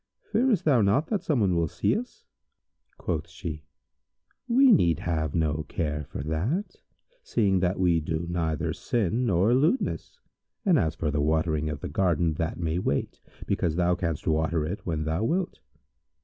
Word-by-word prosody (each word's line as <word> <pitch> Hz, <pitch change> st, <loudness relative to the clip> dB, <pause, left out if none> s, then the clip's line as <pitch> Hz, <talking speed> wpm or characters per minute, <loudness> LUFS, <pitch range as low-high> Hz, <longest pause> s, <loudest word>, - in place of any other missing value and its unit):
Fearest 235 Hz, -5 st, +2 dB
thou 135 Hz, -7 st, +4 dB
not 105 Hz, +10 st, +3 dB
that 210 Hz, -3 st, 0 dB
someone 105 Hz, -, +1 dB
will 85 Hz, -1 st, +1 dB
see -, -, 0 dB
us?" 245 Hz, +3 st, -6 dB, 0.7 s
Quoth 80 Hz, -2 st, -3 dB
she, 80 Hz, -4 st, -7 dB, 0.8 s
"We 260 Hz, +2 st, +6 dB
need 85 Hz, -, +4 dB
have 80 Hz, -3 st, -1 dB
no 80 Hz, -2 st, +1 dB
care 75 Hz, -2 st, -2 dB
for 70 Hz, -, -6 dB
that, 100 Hz, -, -2 dB, 0.4 s
seeing 100 Hz, -, +1 dB
that 90 Hz, +1 st, 0 dB
we 90 Hz, -3 st, +3 dB
do 80 Hz, +2 st, -3 dB
neither 80 Hz, -3 st, -1 dB
sin 120 Hz, +2 st, 0 dB
nor 95 Hz, +4 st, +3 dB
lewdness; 165 Hz, -, 0 dB, 0.5 s
and, 180 Hz, -7 st, +4 dB
as 80 Hz, -3 st, 0 dB
for 75 Hz, -1 st, -1 dB
the 75 Hz, 0 st, 0 dB
watering 80 Hz, 0 st, +1 dB
of 75 Hz, -2 st, -5 dB
the -, -, -4 dB
garden, 85 Hz, -3 st, +1 dB
that 80 Hz, +1 st, -3 dB
may 85 Hz, 0 st, -1 dB
wait, -, -, -2 dB, 0.2 s
because 80 Hz, -3 st, 0 dB
thou 90 Hz, 0 st, +2 dB
canst 85 Hz, -4 st, -3 dB
water 80 Hz, 0 st, +1 dB
it 90 Hz, +6 st, -5 dB
when 80 Hz, -2 st, -1 dB
thou 80 Hz, +6 st, -1 dB
wilt." 175 Hz, +8 st, -1 dB
85 Hz, 165 wpm, -27 LUFS, 80-115 Hz, 0.8 s, We